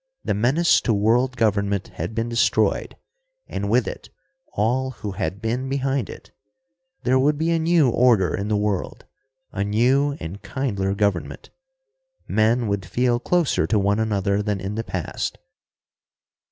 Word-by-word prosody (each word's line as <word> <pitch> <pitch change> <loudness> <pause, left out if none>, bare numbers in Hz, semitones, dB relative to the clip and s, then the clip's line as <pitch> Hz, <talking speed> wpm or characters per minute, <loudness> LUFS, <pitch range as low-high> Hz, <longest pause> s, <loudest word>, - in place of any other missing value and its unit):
The - - +1
menace 130 - +3
to 115 - +1
world 120 +5 +2
government 100 -3 0
had 110 - -6
been 115 +1 -1
destroyed 115 0 +1 0.5
and - - -3
with - - +2
it - - -7 0.4
all 125 +6 0
who 110 -5 -6
had 95 +2 -4
been 125 +4 -2
behind 135 -1 -1
it. - - -11 0.7
There 130 +1 +3
would 145 +2 +2
be 160 +2 0
a 165 - +2
new 165 -3 +3
order 115 -8 +3
in 100 - -2
the 105 -1 +1
world, 105 -3 -2 0.5
a 100 - -2
new 130 +8 +2
and 85 +5 -7
kindlier 100 -8 -2
government. 100 -4 -2 0.8
Men 115 +2 +2
would 100 -2 -1
feel 120 +7 0
closer 175 +3 +1
to 110 - +2
one 100 +1 +1
another 100 -2 0
than 105 -1 -2
in 95 +2 -4
the 115 +2 -3
past. - - -4
110 Hz, 155 wpm, -23 LUFS, 100-130 Hz, 0.8 s, menace